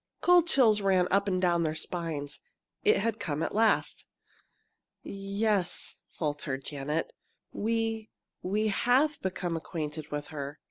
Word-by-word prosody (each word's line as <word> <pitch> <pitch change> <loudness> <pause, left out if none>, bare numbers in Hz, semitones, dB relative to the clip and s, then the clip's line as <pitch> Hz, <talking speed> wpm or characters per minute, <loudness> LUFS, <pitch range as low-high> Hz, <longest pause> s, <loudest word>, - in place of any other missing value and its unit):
Cold 355 -1 +5
chills 230 -9 +4
ran 190 -2 +3
up 200 +1 +3
and 185 -2 +1
down 175 -2 +2
their 155 -1 0
spines. 155 -3 -4 0.4
It 430 0 +5
had 225 -1 -1
come 160 -5 -2
at - - -2
last! 225 +1 +1 1.0
"Yes," 200 -1 -1
faltered 145 -3 -3
Janet, 150 +3 -3 0.4
"we 225 0 -1 0.3
we 210 +4 0
have 265 +8 +2
become 180 -2 -2
acquainted 155 -2 -5
with 145 0 -4
her." 145 -1 -6
185 Hz, 130 wpm, -29 LUFS, 155-220 Hz, 1.0 s, Cold